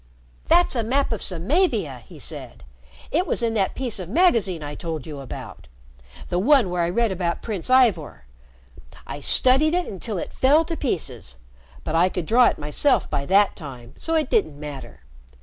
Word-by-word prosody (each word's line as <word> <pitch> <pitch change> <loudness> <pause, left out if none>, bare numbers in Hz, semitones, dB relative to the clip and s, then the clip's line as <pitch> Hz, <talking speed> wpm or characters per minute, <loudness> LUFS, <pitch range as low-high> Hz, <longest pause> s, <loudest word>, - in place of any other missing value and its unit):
"That's 345 -3 +4
a 235 - +1
map 265 +5 0
of 220 - -5
Samavia," 195 - 0
he - - -13
said. - - -8 0.5
"It 355 +5 +1
was 245 - -1
in 230 -1 +1
that 200 -4 0
piece 250 -6 -3
of 180 -2 -7
magazine 220 - +2
I 145 0 -5
told 160 -3 -5
you 150 -3 -7
about 135 - -9 0.6
the 175 - 0
one 245 -3 +4
where 180 -1 0
I 170 - +1
read 230 +4 +1
about 175 -2 -2
Prince 205 -5 -4
Ivor. 225 - +2 0.8
I - - -7
studied 280 +6 +3
it 360 -1 0
until 200 +2 -5
it - - -5
fell 295 +5 +4
to 330 - -4
pieces. 130 - -4 0.5
But - - -4
I 170 +3 +4
could 180 -2 -4
draw 240 +7 +5
it - - 0
myself 150 - +1
by 140 0 -2
that 200 +1 +4
time, 130 -6 -10
so 325 - -2
it 310 -4 0
didn't 145 -2 +1
matter. 145 - -9
195 Hz, 185 wpm, -23 LUFS, 160-260 Hz, 0.8 s, draw